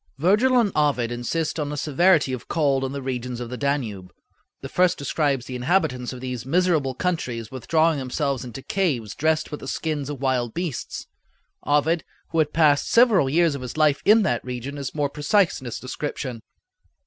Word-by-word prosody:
Virgil 210 - +3
and 215 -4 +2
Ovid 140 -6 +1
insist 150 +7 -2
on 145 -1 -2
the 150 - -4
severity 150 0 +3
of 125 - -6
cold 140 -5 +1
in 130 - -2
the 140 -1 -5
regions 125 -2 -4
of 120 -1 -6
the - - -3
Danube. 120 -10 -2 0.5
The - - -6
first 180 0 +2
describes 140 -3 0
the 130 - -6
inhabitants 125 -2 0
of 125 -1 -8
these 125 -2 -4
miserable 155 -2 +1
countries 125 -10 -2
withdrawing 155 +4 +1
themselves 135 0 -2
into 125 +2 -8
caves 140 - -1
dressed 155 +1 0
with 150 - -5
the - - -9
skins 150 -2 -3
of 145 -3 -5
wild 130 -3 -1
beasts. 170 -7 -4 0.6
Ovid, 150 +3 +2 0.3
who 165 - -1
had 150 -1 +2
passed 150 -3 +3
several 225 - +5
years 165 +2 +3
of 140 - -5
his 125 +3 -7
life 150 -2 +3
in 215 +1 +6
that - - 0
region, 125 +3 -5
is 140 0 -5
more 145 -2 +1
precise 155 +5 +1
in - - -11
his 120 - -5
description. 130 -2 -5
140 Hz, 185 wpm, -24 LUFS, 125-160 Hz, 0.6 s, in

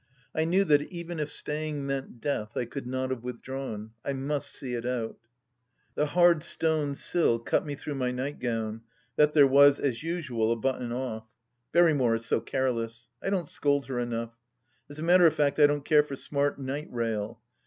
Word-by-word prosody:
I 160 - +1
knew 185 +4 +3
that 150 -5 +4
even 170 -1 -5
if 150 -1 -2
staying 150 -1 -3
meant 135 -3 -4
death, 115 -5 -3
I 125 - 0
could 130 +2 -7
not 130 +1 -2
have 130 -3 -3
withdrawn. 125 -3 -6
I 140 - -2
must 140 +1 -2
see 125 -2 -4
it 120 -1 -3
out.... 120 -2 -3 0.7
The 150 - 0
hard 175 +1 +4
stone 155 -3 0
sill 165 -6 +1
cut 115 +6 0
me 145 - -3
through 145 +1 -5
my 130 -2 -1
nightgown, 120 -4 -3 0.3
that 150 0 +4
there 145 -2 +7
was, 140 +1 +6
as 125 -5 -1
usual, 140 -10 -1
a - - +3
button 125 0 -2
oft. 115 -3 -4 0.4
Berrymore 150 -9 +4
is 115 0 -4
so - - +1
careless. 115 -2 -2
I - - -2
don't 185 -5 -1
scold 140 -1 +1
her 130 -2 -3
enough. 115 -1 -3 0.6
As 145 - -10
a 155 - -5
matter 175 +1 +6
of 160 - +1
fact 145 0 +1
I 145 - +8
don't 145 -1 -2
care 150 -2 +6
for 145 -2 -6
smart 140 +1 -1
"night 140 +3 -4
rail." 115 -2 -2
135 Hz, 190 wpm, -28 LUFS, 120-150 Hz, 0.7 s, I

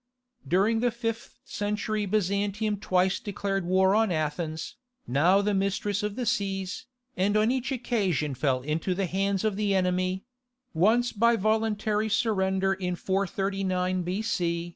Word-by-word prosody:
During 205 +5 +2
the 245 +1 +2
fifth 230 0 -5
century 210 0 -2
Byzantium 205 +1 0
twice 185 -1 +1
declared 195 -2 -3
war 190 +1 +4
on 220 -2 +3
Athens, 155 0 -3 0.3
now 175 +10 +3
the 210 0 +1
mistress 200 +1 0
of 210 -1 -3
the 250 - -3
seas, 195 -1 -2 0.3
and 200 +3 +2
on 215 +2 +3
each 260 +1 -2
occasion 195 - 0
fell 130 -1 0
into 160 +5 -1
the 195 +1 0
hands 195 +2 0
of 215 -3 0
the 205 -2 +1
enemy—once 220 +4 0
by 235 +2 +3
voluntary 215 0 0
surrender 195 -3 +1
in 180 -2 -3
439 190 -1 -1
B.C. 175 -2 -1
195 Hz, 135 wpm, -27 LUFS, 185-215 Hz, 0.3 s, war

